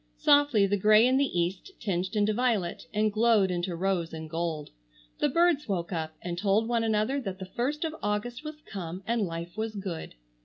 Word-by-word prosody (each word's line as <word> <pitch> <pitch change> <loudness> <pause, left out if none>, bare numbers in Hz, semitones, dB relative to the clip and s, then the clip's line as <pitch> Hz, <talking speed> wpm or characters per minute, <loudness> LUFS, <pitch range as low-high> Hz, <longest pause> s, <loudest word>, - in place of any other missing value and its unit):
Softly 290 -8 +4
the 200 +1 +1
grey 215 +3 +6
in 255 +1 +3
the 275 -10 +1
East 180 - -2
tinged 185 -2 -2
into 210 0 +2
violet 210 -9 0
and 215 0 +1
glowed 215 -3 +4
into 175 0 -2
rose 175 -2 -1
and 160 0 -6
gold. 165 -2 -3 0.5
The - - +2
birds 335 -1 +2
woke 175 -3 -2
up 160 -1 -3
and 175 -1 -3
told 210 +3 +2
one 235 -1 +1
another 220 +5 +1
that 195 -6 -5
the 190 - -6
first 260 - -2
of 315 - -3
August 210 +6 -2
was 305 0 -8
come 185 -1 -6
and 230 +1 0
life 170 +1 -6
was 220 0 -3
good. 185 - -5
205 Hz, 195 wpm, -28 LUFS, 175-235 Hz, 0.5 s, grey